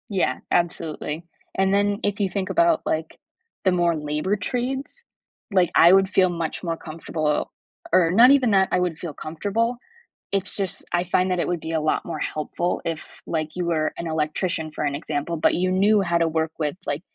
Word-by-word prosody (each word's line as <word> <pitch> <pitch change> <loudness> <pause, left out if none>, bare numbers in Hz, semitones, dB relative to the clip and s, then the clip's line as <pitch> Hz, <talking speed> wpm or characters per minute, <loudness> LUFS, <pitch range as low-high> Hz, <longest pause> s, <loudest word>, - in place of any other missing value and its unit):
Yeah, 185 -10 0
absolutely. 165 -2 -1 0.3
And 190 0 +2
then 205 0 +2
if 205 0 -1
you 200 -2 +1
think 190 +1 -3
about, 340 -2 +3
like, 160 0 -2 0.5
the 190 - +5
more 175 -2 +2
labor 150 +6 -1
trades, 265 - -3 0.5
like, 185 -3 +4
I 170 +2 +8
would 195 0 +5
feel 185 -2 +3
much 170 0 -4
more 165 -2 -2
comfortable 155 -2 -2 0.4
or 175 -3 +5
not 235 +7 +7
even 265 -5 +4
that 190 -1 +4
I - - +3
would 180 -3 -1
feel 170 -4 -5
comfortable, 205 - -2 0.5
it's 195 -1 -1
just 195 -2 -3
I 175 0 +2
find 185 +1 +1
that 180 - 0
it - - 0
would 175 -1 -1
be 160 +1 -6
a 160 -1 0
lot 155 - 0
more 165 -3 -4
helpful 155 +4 -2
if, 165 -2 -3 0.2
like, 155 -1 -1
you 180 -1 -2
were 160 -2 0
an 170 - -4
electrician 160 +1 -1
for 150 - -4
an 145 -1 -1
example, 150 +2 -3
but 155 - +3
you 185 +1 +1
knew 200 +3 +4
how 175 -3 +1
to 165 -1 +2
work 160 0 -1
with, 150 0 -1
like, 145 +2 -2
175 Hz, 200 wpm, -23 LUFS, 160-195 Hz, 0.5 s, I